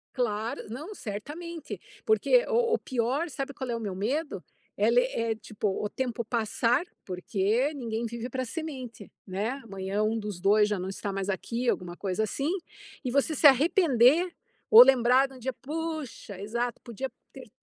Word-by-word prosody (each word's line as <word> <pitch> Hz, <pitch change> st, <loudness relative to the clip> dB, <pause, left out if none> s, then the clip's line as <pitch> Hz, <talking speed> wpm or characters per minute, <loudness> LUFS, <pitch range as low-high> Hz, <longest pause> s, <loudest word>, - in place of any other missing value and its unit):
Claro. 225 Hz, -2 st, -1 dB
Não, 305 Hz, -, -7 dB
certamente. 305 Hz, -, -6 dB, 0.3 s
Porque 485 Hz, +3 st, +4 dB
o 470 Hz, -1 st, +2 dB
o -, -, 0 dB
pior, 260 Hz, +7 st, -1 dB
sabe 275 Hz, 0 st, -4 dB
qual 260 Hz, -1 st, -6 dB
é 235 Hz, -, 0 dB
o -, -, -3 dB
meu 205 Hz, -3 st, -3 dB
medo? 270 Hz, -, -2 dB, 0.4 s
Ele -, -, +4 dB
é 230 Hz, -, -1 dB
tipo, 215 Hz, -1 st, -4 dB, 0.2 s
o 210 Hz, -, -1 dB
tempo 245 Hz, -1 st, -3 dB
passar 230 Hz, -, +1 dB, 0.2 s
porque 200 Hz, -, 0 dB
ninguém 235 Hz, -4 st, -3 dB
vive 235 Hz, +1 st, -5 dB
pra 260 Hz, +1 st, -2 dB
semente, 255 Hz, -, -6 dB, 0.2 s
né, 215 Hz, +9 st, -3 dB
amanhã 195 Hz, 0 st, -2 dB
um 220 Hz, +1 st, +1 dB
dos 210 Hz, -4 st, -5 dB
2 210 Hz, +2 st, +5 dB
já 210 Hz, -2 st, -1 dB
não 185 Hz, +1 st, -4 dB
está 195 Hz, +1 st, -4 dB
mais 195 Hz, 0 st, -3 dB
aqui, 230 Hz, +5 st, -1 dB
alguma 175 Hz, -4 st, -2 dB
coisa 190 Hz, +2 st, -1 dB
assim, 275 Hz, +8 st, -1 dB, 0.5 s
e -, -, 0 dB
você 280 Hz, +4 st, +2 dB
se 295 Hz, -, +7 dB
arrepender, 295 Hz, +1 st, +5 dB, 0.4 s
ou 455 Hz, +2 st, +12 dB
lembrar 255 Hz, -, +5 dB
de 270 Hz, -, -16 dB
um -, -, -12 dB
dia: 260 Hz, +2 st, -3 dB
"Puxa" 300 Hz, -, -5 dB
exato, 235 Hz, +4 st, -2 dB
"Podia 255 Hz, +3 st, -5 dB, 0.2 s
ter" 260 Hz, -4 st, -11 dB
240 Hz, 170 wpm, -28 LUFS, 210-280 Hz, 0.5 s, ou